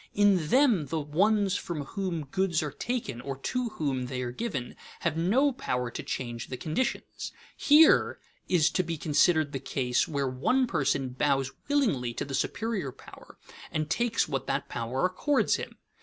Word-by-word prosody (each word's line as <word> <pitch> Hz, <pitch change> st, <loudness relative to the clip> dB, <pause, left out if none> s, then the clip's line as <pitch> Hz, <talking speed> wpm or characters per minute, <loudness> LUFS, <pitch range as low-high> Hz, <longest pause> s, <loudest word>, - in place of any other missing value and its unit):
In 200 Hz, -6 st, +4 dB
them 235 Hz, -, +4 dB
the 160 Hz, +3 st, -2 dB
ones 195 Hz, +7 st, +2 dB
from 165 Hz, -5 st, -4 dB
whom 175 Hz, -3 st, -3 dB
goods 170 Hz, +2 st, 0 dB
are 150 Hz, -, -3 dB
taken 235 Hz, -, -3 dB
or 135 Hz, +1 st, -4 dB
to 250 Hz, -, -2 dB
whom 135 Hz, -5 st, -1 dB
they 125 Hz, 0 st, -3 dB
are 120 Hz, -, -3 dB
given 130 Hz, -, -4 dB, 0.3 s
have 170 Hz, -3 st, 0 dB
no 225 Hz, -, +3 dB
power 125 Hz, -, -2 dB
to -, -, -5 dB
change 120 Hz, -3 st, -4 dB
the 125 Hz, -, -5 dB
conditions; 160 Hz, -, -3 dB, 0.2 s
here 305 Hz, +2 st, +5 dB, 0.3 s
is 170 Hz, -4 st, +4 dB
to -, -, +2 dB
be 170 Hz, -2 st, -4 dB
considered 155 Hz, 0 st, +3 dB
the 135 Hz, -, -3 dB
case 125 Hz, -2 st, 0 dB
where 140 Hz, -3 st, -1 dB
the 250 Hz, -, +2 dB
person 135 Hz, -, 0 dB
bows 135 Hz, +1 st, 0 dB, 0.2 s
willingly 180 Hz, -, +1 dB
to -, -, -3 dB
the 135 Hz, -, -7 dB
superior 195 Hz, -, -1 dB
power -, -, -15 dB, 0.3 s
and 155 Hz, 0 st, -2 dB
takes 240 Hz, -1 st, +1 dB
what 135 Hz, -3 st, -3 dB
that -, -, -1 dB
power 120 Hz, +7 st, -2 dB
accords 260 Hz, +10 st, +2 dB
him. -, -, -7 dB
155 Hz, 170 wpm, -28 LUFS, 135-205 Hz, 0.3 s, here